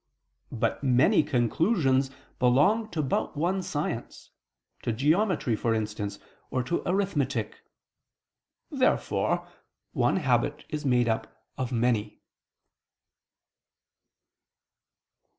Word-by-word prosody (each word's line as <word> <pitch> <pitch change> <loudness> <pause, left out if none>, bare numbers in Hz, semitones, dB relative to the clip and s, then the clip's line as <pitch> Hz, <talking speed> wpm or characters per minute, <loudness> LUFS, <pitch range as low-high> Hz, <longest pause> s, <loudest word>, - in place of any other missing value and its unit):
But 115 +3 -1
many 130 +1 +4
conclusions 135 - +1 0.3
belong 150 - +3
to 160 -5 -2
but 135 - -1
one 180 +5 0
science, 145 -8 -4 0.5
to - - -1
geometry, 150 - +1
for 115 +1 0
instance, 105 -2 -3 0.3
or 130 - -1
to 135 +7 -1
arithmetic. 145 - -1 1.1
Therefore - - +1 0.4
one 120 - +1
habit 145 -1 0
is 150 -1 -4
made 125 -2 +3
up 110 -1 -3
of 130 -1 -3
many. 115 -3 0
130 Hz, 90 wpm, -27 LUFS, 120-155 Hz, 1.1 s, many